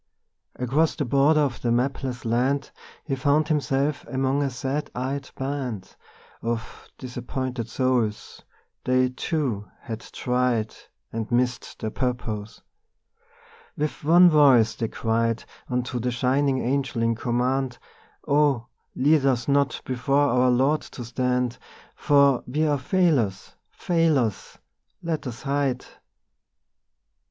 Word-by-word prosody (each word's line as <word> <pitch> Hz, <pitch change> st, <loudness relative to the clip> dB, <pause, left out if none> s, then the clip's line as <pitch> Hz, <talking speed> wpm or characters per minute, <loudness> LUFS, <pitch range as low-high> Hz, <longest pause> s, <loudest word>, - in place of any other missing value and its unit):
Across 140 Hz, +6 st, +1 dB
the 145 Hz, -, -2 dB
border 140 Hz, +5 st, +4 dB
of 135 Hz, -5 st, -1 dB
the 120 Hz, -, 0 dB
mapless 125 Hz, 0 st, -1 dB
land 130 Hz, +5 st, 0 dB, 0.3 s
He 140 Hz, -, -3 dB
found 145 Hz, +3 st, +2 dB
himself 145 Hz, -1 st, 0 dB
among 135 Hz, +1 st, 0 dB
a 140 Hz, -, +1 dB
sad 135 Hz, +3 st, -3 dB
eyed 135 Hz, +2 st, -3 dB
band 130 Hz, -8 st, -4 dB, 0.5 s
Of 115 Hz, 0 st, -5 dB
disappointed 125 Hz, -1 st, -4 dB
souls; 125 Hz, -5 st, -1 dB, 0.4 s
they, 130 Hz, 0 st, +2 dB
too, 125 Hz, -6 st, -2 dB
had 115 Hz, -2 st, -6 dB
tried 125 Hz, -2 st, -1 dB, 0.4 s
And 115 Hz, 0 st, -4 dB
missed 125 Hz, +1 st, 0 dB
their 110 Hz, -, -4 dB
purpose. 115 Hz, -4 st, -3 dB, 1.1 s
With 150 Hz, 0 st, -3 dB
one 175 Hz, +4 st, +7 dB
voice 130 Hz, -7 st, +5 dB
they 115 Hz, +1 st, -2 dB
cried 115 Hz, +1 st, -1 dB, 0.2 s
Unto 125 Hz, 0 st, -2 dB
the 125 Hz, +2 st, -1 dB
shining 130 Hz, +3 st, +1 dB
Angel 130 Hz, -2 st, 0 dB
in 115 Hz, 0 st, +2 dB
command: 125 Hz, +2 st, -1 dB, 0.5 s
'Oh, 140 Hz, -5 st, +3 dB, 0.3 s
lead 145 Hz, +2 st, +3 dB
us 125 Hz, -3 st, +1 dB
not 140 Hz, -1 st, +1 dB
before 135 Hz, +3 st, +1 dB
our 125 Hz, +1 st, +3 dB
Lord 135 Hz, +5 st, +2 dB
to 120 Hz, -, -9 dB
stand, 125 Hz, 0 st, -1 dB, 0.3 s
For 140 Hz, -3 st, +3 dB
we 150 Hz, +5 st, 0 dB
are 145 Hz, -2 st, +1 dB
failures, 130 Hz, -, +1 dB, 0.2 s
failures! 155 Hz, -, 0 dB, 0.5 s
Let 160 Hz, -4 st, -2 dB
us 120 Hz, +3 st, -7 dB
hide. 140 Hz, -3 st, -1 dB
130 Hz, 120 wpm, -25 LUFS, 120-140 Hz, 1.1 s, one